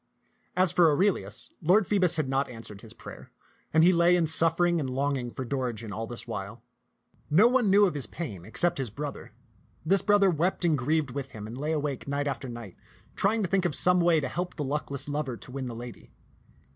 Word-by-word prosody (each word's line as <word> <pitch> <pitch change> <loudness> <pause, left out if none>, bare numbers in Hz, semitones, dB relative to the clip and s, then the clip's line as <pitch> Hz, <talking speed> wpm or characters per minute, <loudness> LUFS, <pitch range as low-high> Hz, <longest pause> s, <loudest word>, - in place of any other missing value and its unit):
As 185 -2 +4
for 170 -2 +5
Aurelius, 185 +7 0
Lord 185 +6 +4
Phoebus 185 -3 +3
had 155 -4 -1
not 135 +1 0
answered 115 -4 -10
his - - -12
prayer, - - -12 0.4
and 160 0 +4
he 180 +2 +6
lay 170 +1 +4
in 175 -2 +2
suffering 165 +2 +1
and 135 -4 -3
longing 135 -1 -1
for 130 +2 -6
Dorigen 120 -5 -4
all 110 +2 -4
this 120 0 -5
while. - - -6 0.7
No 190 +10 +6
one 245 -4 +2
knew 205 +2 +6
of 180 - 0
his 145 -3 -5
pain 105 - -7
except 170 - 0
his 130 -4 -2
bro 145 +7 -5
ther. - - -13 0.5
This 195 +3 +3
brother 205 -2 +4
wept 175 +3 0
and 165 -3 +3
grieved 145 +1 0
with 135 0 -6
him, 105 -1 -8
and 110 +2 -8
lay 150 +4 -3
awake 145 -4 -3
night 140 +1 -1
after 140 -2 -4
night, 115 -6 -9 0.4
trying 210 +2 +1
to - - 0
think 190 +1 +1
of 160 -5 0
some 180 +4 +4
way 170 -2 +4
to 135 - -3
help 180 +7 -4
the 150 - -3
luckless 140 0 +1
lover 145 -4 -3
to - - -12
win 135 -1 -5
the 120 - -6
lady. 120 0 -10
150 Hz, 215 wpm, -27 LUFS, 130-175 Hz, 0.7 s, he